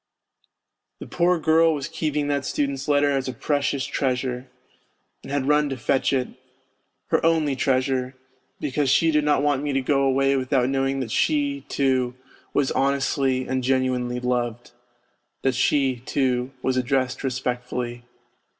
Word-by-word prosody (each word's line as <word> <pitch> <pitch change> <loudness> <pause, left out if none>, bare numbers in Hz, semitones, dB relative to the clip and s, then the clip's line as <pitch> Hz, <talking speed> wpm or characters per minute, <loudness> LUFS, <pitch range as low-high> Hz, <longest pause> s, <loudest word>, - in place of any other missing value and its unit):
The - - -7
poor 180 +1 +2
girl 160 0 +3
was 140 -2 -4
keeping 150 -2 -2
that 140 -1 0
student's 140 -1 -2
letter 145 -1 +3
as 135 -1 -1
a 130 - -3
precious 140 +1 -1
treasure, 130 -1 -2 0.7
and - - -10
had 140 -1 -1
run 150 0 +3
to 135 - -4
fetch 130 +2 +1
it, 130 -2 0 0.8
her 160 - +2
only 160 -4 +2
treasure, 130 -1 0 0.4
because 145 -1 -1
she 160 +4 +4
did 150 -1 +2
not 145 -1 +2
want 145 -2 +1
me 145 -1 -2
to 135 - +2
go 135 +1 +1
away 135 0 +2
without 130 -1 +1
knowing 135 0 0
that 115 -4 -5
she, 285 - +1
too, 130 -3 +1 0.4
was 140 -2 +1
honestly 135 -1 0
and 130 -1 -1
genuinely 125 -1 0
loved; 120 -1 -2 0.7
that 135 - +2
she, 130 0 +2
too, 125 0 -1
was 130 0 +1
addressed 130 0 0
respectfully. 125 -2 -3
135 Hz, 150 wpm, -24 LUFS, 130-145 Hz, 0.8 s, she